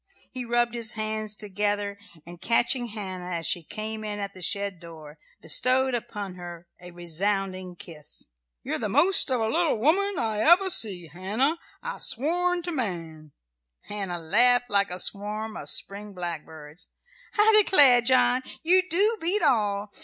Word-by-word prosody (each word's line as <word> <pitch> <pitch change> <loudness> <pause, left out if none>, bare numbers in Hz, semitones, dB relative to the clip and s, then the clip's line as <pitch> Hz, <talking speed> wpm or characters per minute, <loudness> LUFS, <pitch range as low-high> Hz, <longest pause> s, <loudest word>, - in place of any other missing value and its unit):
He 255 -1 -6
rubbed 240 0 0
his 235 -1 -1
hard 215 -1 -3
hands 215 -1 -3
together, 205 0 -2 0.3
and 175 +1 -12
catching 240 +4 +2
Hannah 185 -5 -6
as 165 -1 -5
she 175 - -1
came 215 +6 -6
in 210 -1 -4
at 200 -1 -5
the 185 - -13
shed 200 -1 -2
door, 160 -3 -13 0.2
bestowed 255 - +2
upon 205 -5 -5
her 175 -1 -10
a 180 - -11
resounding 185 +2 -2
kiss. 165 - -5 0.3
"You're - - -3
the 215 - -3
most 300 - +4
of 255 -2 0
a 225 - 0
little 325 +1 0
woman 370 - +1
I 220 -4 -2
ever 355 - +5
see, 190 - +5
Hannah, 205 - -2 0.3
I 485 - -6
swan 350 +7 0
to 350 - -4
man." 165 - -6 0.5
Hannah 195 -4 -4
laughed 245 +8 +2
like 200 0 +2
a 180 - -6
swarm 210 +3 -1
of - - -4
spring 200 0 -2
blackbirds. 160 -3 -8 0.5
"I 425 0 +7
declare, 275 -11 +6
John, 255 +1 +3 0.2
you 365 +3 +4
do 410 +6 +3
beat 370 +6 +1
all! 205 -3 0
210 Hz, 160 wpm, -25 LUFS, 180-255 Hz, 0.5 s, I